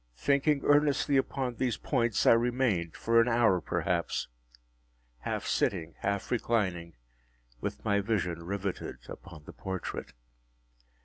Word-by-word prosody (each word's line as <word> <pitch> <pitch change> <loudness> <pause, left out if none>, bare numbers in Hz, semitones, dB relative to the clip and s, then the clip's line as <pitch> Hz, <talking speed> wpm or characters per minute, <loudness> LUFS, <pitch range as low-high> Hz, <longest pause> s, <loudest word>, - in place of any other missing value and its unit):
Thinking 140 - +2
earnestly 145 0 +3
upon 135 -1 0
these 125 -4 0
points, 120 -5 0
I - - +8
remained, 115 -8 +1
for 115 0 +3
an 115 - +1
hour 115 -6 +3
perhaps, - - -1 0.9
half - - -3
sitting, 80 0 0
half 100 0 -2
reclining, 95 -9 0 0.6
with - - -5
my 100 -1 +3
vision 95 -5 -1
riveted 95 -9 -5
upon 80 -2 -10
the - - -11
portrait. 95 -2 -5
115 Hz, 120 wpm, -30 LUFS, 90-125 Hz, 0.9 s, I